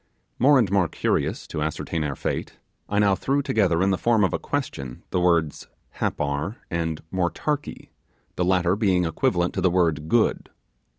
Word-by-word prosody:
More 140 +3 +6
and 110 -7 +2
more 100 -4 +3
curious - - -1
to 75 - -5
ascertain 80 +1 -2
our 70 -2 -2
fate, - - -4 0.3
I 105 - -1
now 100 -1 +4
threw 140 +8 0
together 95 -8 +2
in 100 - +2
the 95 - 0
form 115 -3 +3
of 95 - +1
a - - -1
question 65 -2 -4
the - - +1
words 85 -4 +1 0.3
'Happar' 75 +7 -1 0.2
and 80 -2 -2
'Motarkee', 135 +11 -2 0.5
the 90 - 0
latter 90 0 +2
being 95 -4 +2
equivalent 85 +2 0
to 95 - -2
the 95 - +4
word 80 -4 +1
'good'. 120 -2 +1
90 Hz, 170 wpm, -24 LUFS, 80-100 Hz, 0.5 s, More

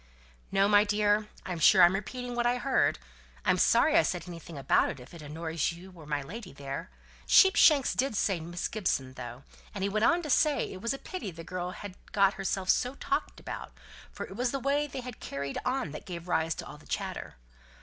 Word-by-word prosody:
"No, 195 0 +4
my 205 0 +6
dear. 210 0 +2 0.2
I'm 180 -3 -4
sure 180 +3 +7
I'm 175 +1 +7
repeating 245 +5 -4
what 240 0 +1
I 245 +1 +2
heard. 260 +1 +2 0.5
I'm - - +3
sorry 310 - +4
I 335 - +7
said 180 - -2
anything 170 -2 -9
about 135 - +3
it, 135 - -6
if 125 - -13
it 170 - -10
annoys 160 +2 -2
you 175 +3 -11
or 160 -3 -13
my 145 -2 -1
lady 190 +6 -8
there. 140 +5 -6 0.4
Sheepshanks 315 -8 +6
did 265 -3 0
say 195 -3 +1
Miss 175 +2 -4
Gibson, 135 -11 -1
though, 125 0 -8 0.3
and 195 - -3
he 200 - +1
went 215 +1 0
on 345 +4 +3
to 300 - -5
say 300 +2 +2
it 185 - -9
was 235 +5 -1
a - - -6
pity 275 - -6
the 165 -1 -9
girl 180 +1 -4
had 200 +1 -8 0.2
got 200 -1 +4
herself 190 -1 -2
so 250 +2 0
talked - - -2
about; - - -7 0.4
for - - -6
it 190 - -10
was 245 +3 0
the 275 - -1
way 285 +3 +1
they 265 -2 -6
had 250 -2 -8
carried 140 0 -4
on 255 - -1
that 150 - -9
gave 175 -1 -7
rise 165 -2 +1
to - - -7
all - - -10
the - - -18
chatter. - - -4
195 Hz, 220 wpm, -29 LUFS, 165-245 Hz, 0.5 s, sure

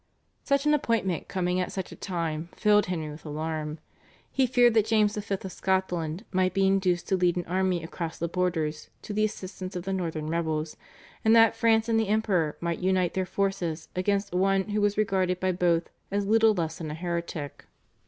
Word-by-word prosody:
Such 280 0 +1
an 300 - +4
appointment 225 - 0
coming 180 -1 0
at 180 - -2
such 190 -2 -5
a - - -8
time 165 -3 -3
filled 210 -1 +3
Henry 160 -4 -3
with 150 - -11
alarm. 155 0 -4 0.5
He 265 -1 +2
feared 245 -1 +4
that 220 -1 +3
James 215 -2 +3
V. 205 -1 -2
of 190 0 -7
Scotland 180 -1 -1
might 185 -1 +1
be 195 0 +3
induced 190 -2 +1
to 190 - +3
lead 180 -2 +2
an 175 - -2
army 185 -1 0
across 165 0 -5
the 170 - -2
borders 165 -4 -1
to 210 - -5
the 215 +1 +1
assistance 185 -2 -4
of 180 - -3
the 195 +1 -2
northern 165 -4 -2
rebels, 160 -1 -2 0.5
and 220 +1 +5
that 225 0 +6
France 225 -1 +3
and 225 -1 +2
the 220 - 0
Emperor 195 -7 +1
might 170 -1 -2
unite 185 -1 +1
their 185 -1 -1
forces 180 -5 -2
against 200 +1 0
one 195 +2 +2
who 210 0 0
was 205 0 +1
regarded 190 -3 +1
by 185 0 +1
both 175 -2 +1 0.2
as 200 0 -1
little 220 +1 +4
less 165 -3 -2
than 160 -2 -5
a 150 - -4
heretic. 170 -4 -4
185 Hz, 195 wpm, -27 LUFS, 170-205 Hz, 0.5 s, that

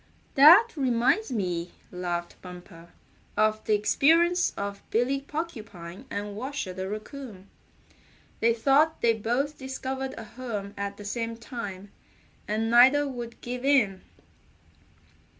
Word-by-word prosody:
"That 345 - +8
reminds 260 - +1
me," 180 -6 -2 0.2
laughed 175 -1 -4
Bumper, 175 -2 -12 0.5
"of 215 0 +2
the 215 - +3
experience 330 - +3
of 200 0 -4
Billy 255 +4 +1
Porcupine 220 - -7
and 205 0 -5
Washer 255 -4 -4
the 190 +1 -5
Raccoon. 215 -2 -8 0.9
They 230 - +3
thought 280 +7 +3
they 230 -1 +4
both 245 +7 -2
discovered 265 0 -4
a 225 - -6
home 215 -4 -6
at 200 0 -4
the 205 - -10
same 230 +2 -3
time, 205 -5 -7 0.6
and 220 +2 -1
neither 265 +5 +6
would 240 -3 -7
give 250 +1 -5
in." 245 -9 +3
230 Hz, 120 wpm, -27 LUFS, 200-270 Hz, 0.9 s, That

